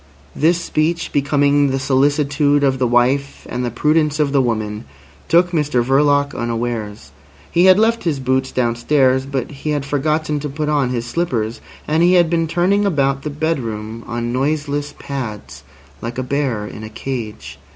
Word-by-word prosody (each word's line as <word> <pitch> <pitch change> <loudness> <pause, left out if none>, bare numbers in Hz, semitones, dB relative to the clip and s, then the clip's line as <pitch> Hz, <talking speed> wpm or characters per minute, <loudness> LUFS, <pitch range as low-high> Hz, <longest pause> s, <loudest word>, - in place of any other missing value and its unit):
This 165 +4 +2
speech, 170 +1 -1
becoming 145 0 +2
the 135 - 0
solicitude 145 +2 +2
of 135 -2 +2
the 125 - +2
wife 125 +4 +1
and 125 +1 -3
the 120 - -1
prudence 150 +5 +1
of 145 -2 +2
the 140 -1 +3
woman, 110 - -2 0.4
took 175 +1 +3
Mr 150 -7 +1
Verloc 145 +2 +2
unawares. 115 - -4 0.4
He 175 +2 +4
had 185 0 +7
left 225 +2 +2
his 155 -5 -1
boots 130 0 0
downstairs, 130 +2 +1
but 135 -1 -3
he 145 +2 -6
had 145 -2 -1
forgotten 150 +1 -1
to 150 +1 -4
put 150 +2 -3
on 145 -4 +1
his 120 -2 -2
slippers, 120 -6 -2 0.3
and 155 +2 +1
he 175 +1 +5
had 175 -2 +4
been 165 -1 +1
turning 180 +5 +2
about 140 -8 +1
the 150 - -4
bedroom 115 -8 -3
on 120 0 -3
noiseless 145 +2 -1
pads 105 - -6 0.4
like 120 +1 -5
a 130 - -1
bear 130 -5 -1
in 105 +1 -9
a 110 - -7
cage. 115 -2 -6
140 Hz, 170 wpm, -19 LUFS, 120-150 Hz, 0.4 s, had